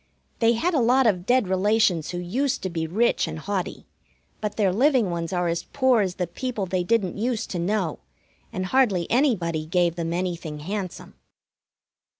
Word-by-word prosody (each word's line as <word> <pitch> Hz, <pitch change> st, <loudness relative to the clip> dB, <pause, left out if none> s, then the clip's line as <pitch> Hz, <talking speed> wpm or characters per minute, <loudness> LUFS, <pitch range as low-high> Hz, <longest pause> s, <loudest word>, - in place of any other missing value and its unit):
They 230 Hz, 0 st, +4 dB
had 340 Hz, +11 st, 0 dB
a 300 Hz, -, +3 dB
lot 250 Hz, +2 st, +4 dB
of 185 Hz, -5 st, +1 dB
dead 250 Hz, -4 st, +3 dB
relations 190 Hz, -3 st, +2 dB
who 175 Hz, -, -4 dB
used 250 Hz, +10 st, -1 dB
to 185 Hz, -, -2 dB
be 165 Hz, -1 st, -2 dB
rich 220 Hz, +9 st, +1 dB
and -, -, -5 dB
haughty, 190 Hz, +2 st, -4 dB, 0.5 s
but 210 Hz, -1 st, -3 dB
their 195 Hz, -4 st, +2 dB
living 250 Hz, -3 st, +3 dB
ones 170 Hz, 0 st, -3 dB
are 175 Hz, -1 st, 0 dB
as 170 Hz, 0 st, -2 dB
poor 260 Hz, -4 st, +3 dB
as 185 Hz, -2 st, -1 dB
the 180 Hz, -, -1 dB
people 215 Hz, +4 st, -4 dB
they 185 Hz, 0 st, -1 dB
didn't 200 Hz, -1 st, 0 dB
used 230 Hz, 0 st, -2 dB
to 180 Hz, -, -2 dB
know, 180 Hz, -2 st, -1 dB, 0.5 s
and 185 Hz, -, -3 dB
hardly 200 Hz, -6 st, +2 dB
anybody 185 Hz, -, +1 dB
gave 175 Hz, 0 st, +1 dB
them 165 Hz, -1 st, -2 dB
anything 170 Hz, -4 st, -3 dB
handsome. 190 Hz, +2 st, -5 dB
190 Hz, 175 wpm, -24 LUFS, 175-230 Hz, 0.5 s, They